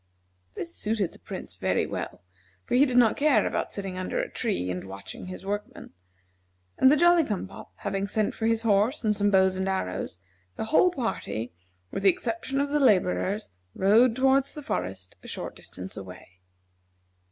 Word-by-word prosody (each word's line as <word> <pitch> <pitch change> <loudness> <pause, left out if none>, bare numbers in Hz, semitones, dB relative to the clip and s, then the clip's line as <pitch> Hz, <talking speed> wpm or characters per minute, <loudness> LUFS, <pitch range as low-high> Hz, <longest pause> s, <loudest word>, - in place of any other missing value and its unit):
This 170 0 -5
suited 210 -4 -1
the - - -17
Prince - - -8
very - - 0
well, - - -5 0.4
for - - -4
he 270 +4 +6
did 250 -1 0
not 235 -3 +5
care 295 -1 +3
about - - -2
sitting 195 -2 -5
under 185 - -3
a - - -2
tree 90 +1 -1
and 90 +1 -5
watching 100 - -8
his 185 +1 -8
workmen, 205 +1 -5 0.9
and 260 - +7
the 300 - +5
Jolly 345 +1 +6
cum 210 -8 -3
pop - - -12
having 195 0 -2
sent 210 +1 0
for 225 - -1
his 225 0 +1
horse 220 +6 +2
and 210 -1 +2
some 205 0 +2
bows 190 -1 +4
and 190 +1 -1
arrows, 90 - -3 0.4
the - - -3
whole 365 - +6
party, 225 - -3 0.4
with - - -3
the 195 - +6
exception 230 +7 -1
of 285 0 0
the 295 +1 +1
laborers, 205 -3 +2 0.3
rode 225 +5 +5
toward 265 +1 +4
the 295 +1 -7
forest, 90 - -4
a - - -12
short - - -5
distance 95 +1 -8
away. 90 -1 -11
205 Hz, 180 wpm, -27 LUFS, 185-250 Hz, 0.9 s, and